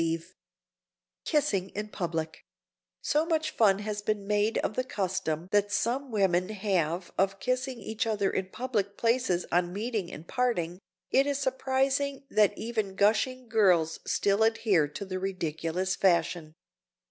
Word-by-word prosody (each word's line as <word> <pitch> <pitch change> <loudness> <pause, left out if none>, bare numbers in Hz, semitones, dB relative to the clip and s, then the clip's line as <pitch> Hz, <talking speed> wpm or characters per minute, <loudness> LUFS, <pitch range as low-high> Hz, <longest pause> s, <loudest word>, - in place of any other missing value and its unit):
[Sidenote: 165 +2 -2 0.9
KISSING 220 - +1
IN 210 +1 -4
PUBLIC] 165 -5 -4 0.6
So 300 +1 +2
much 320 -1 0
fun 200 -4 +4
has 210 0 -4
been 205 -1 -2
made 210 +2 +1
of - - -1
the 255 - 0
custom 185 -7 -2
that 205 0 +2
some 250 +6 0
women 190 -4 +2
have 185 -5 -1
of 195 +1 +2
kissing 255 +1 -1
each 220 +2 -3
other 205 -3 +1
in 190 - -2
public 210 -4 -2
places 230 -6 +1
on 175 0 +2
meeting 210 -2 -3
and 160 - -10
parting, 185 -9 -1 0.3
it 275 +1 +4
is 285 -1 0
surprising 270 +1 0
that 210 -2 +3
even 220 -4 -3
gushing 225 +6 +2
girls 185 -8 +3
still 200 +1 +2
adhere 220 -8 +3
to 150 +7 -7
the 185 -1 -4
ridiculous 185 0 -2
fashion. 170 -3 +1
205 Hz, 145 wpm, -29 LUFS, 180-235 Hz, 0.9 s, fun